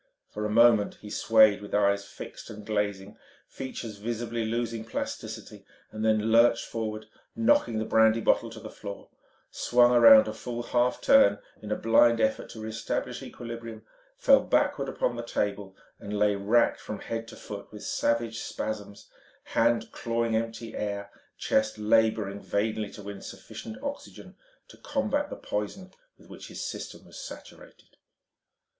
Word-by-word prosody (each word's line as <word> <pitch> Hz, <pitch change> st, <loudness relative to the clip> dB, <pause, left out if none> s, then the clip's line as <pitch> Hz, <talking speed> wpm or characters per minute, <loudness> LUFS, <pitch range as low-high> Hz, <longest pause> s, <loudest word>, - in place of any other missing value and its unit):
For 105 Hz, 0 st, -3 dB
a -, -, -6 dB
moment 115 Hz, -1 st, +5 dB
he 105 Hz, -, -9 dB
swayed 110 Hz, -3 st, +5 dB
with 105 Hz, -, -5 dB
eyes 100 Hz, -1 st, +2 dB
fixed -, -, -10 dB
and 105 Hz, -1 st, -9 dB
glazing, 100 Hz, -2 st, -2 dB, 0.3 s
features 120 Hz, -5 st, -7 dB
visibly 115 Hz, +1 st, -3 dB
losing 115 Hz, 0 st, -2 dB
plasticity, 110 Hz, -, -6 dB, 0.3 s
then 110 Hz, 0 st, +1 dB
lurched 115 Hz, +1 st, +5 dB
forward, 110 Hz, -1 st, -4 dB, 0.3 s
knocking 115 Hz, 0 st, +3 dB
the 110 Hz, -, -1 dB
brandy 110 Hz, +1 st, +4 dB
bottle 115 Hz, +1 st, +2 dB
to 115 Hz, 0 st, -10 dB
the -, -, -9 dB
floor, 100 Hz, -1 st, -9 dB, 0.4 s
swung 120 Hz, 0 st, +4 dB
around 115 Hz, -3 st, +8 dB
a 110 Hz, -, -3 dB
full 120 Hz, +2 st, -5 dB
half 125 Hz, +1 st, +1 dB
turn 100 Hz, 0 st, +6 dB, 0.2 s
in 105 Hz, -, -8 dB
blind 115 Hz, +1 st, +5 dB
effort 110 Hz, 0 st, 0 dB
to 110 Hz, -, -10 dB
re 110 Hz, -, -5 dB
establish 110 Hz, +1 st, -3 dB
equilibrium, 115 Hz, -2 st, -8 dB, 0.3 s
fell -, -, +6 dB
backward -, -, +1 dB
upon -, -, -1 dB
the -, -, -4 dB
table, 100 Hz, -1 st, -3 dB, 0.2 s
and 105 Hz, -1 st, -5 dB
lay 105 Hz, 0 st, +3 dB
racked 105 Hz, +4 st, +2 dB
from 105 Hz, -, -6 dB
head 115 Hz, +1 st, -5 dB
to -, -, -11 dB
foot 100 Hz, -1 st, -9 dB
with 105 Hz, -, -10 dB
savage 115 Hz, -1 st, 0 dB
spasms, 105 Hz, -2 st, -5 dB, 0.4 s
hands 115 Hz, -1 st, +2 dB
clawing 115 Hz, -1 st, -1 dB
empty 115 Hz, 0 st, -3 dB
air, 100 Hz, -1 st, -4 dB, 0.3 s
chest 110 Hz, 0 st, +1 dB
labouring 105 Hz, -2 st, +2 dB
vainly 110 Hz, +1 st, -1 dB
to 105 Hz, -, -11 dB
win 100 Hz, 0 st, -8 dB
sufficient 220 Hz, -, -9 dB
oxygen 280 Hz, 0 st, -7 dB, 0.3 s
to -, -, -16 dB
combat 290 Hz, +1 st, -1 dB
the -, -, -6 dB
poison 185 Hz, -, -5 dB, 0.3 s
with -, -, -19 dB
which -, -, -10 dB
his -, -, -6 dB
system -, -, -7 dB
was -, -, -11 dB
saturated. -, -, -12 dB
110 Hz, 150 wpm, -28 LUFS, 105-115 Hz, 0.4 s, around